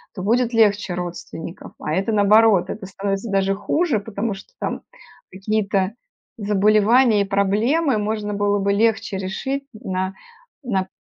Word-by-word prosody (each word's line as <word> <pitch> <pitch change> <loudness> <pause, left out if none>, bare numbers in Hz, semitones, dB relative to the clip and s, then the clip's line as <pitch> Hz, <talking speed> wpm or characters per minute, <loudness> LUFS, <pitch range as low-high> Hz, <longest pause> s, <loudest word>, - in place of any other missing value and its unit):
то 185 - -5
будет 240 +3 +1
легче 205 -4 +3
родственников. 175 0 -7
А 155 - -3
это, 195 +5 0
наоборот, 210 -1 +4
это 200 -2 -6
становится 195 +3 -3
даже 195 0 +2
хуже, 235 - 0
потому 205 +1 -3
что 205 - -12
там - - -3 0.5
какие-то 200 0 -1 0.4
заболевания 210 +2 +4
и - - 0
проблемы 215 +8 +1
можно 210 0 -2
было 205 0 +1
бы 200 +1 +1
легче 215 -2 +1
решить 265 +9 -3
на 190 -2 -3 0.5
на 190 -6 -1
205 Hz, 135 wpm, -21 LUFS, 195-220 Hz, 0.5 s, наоборот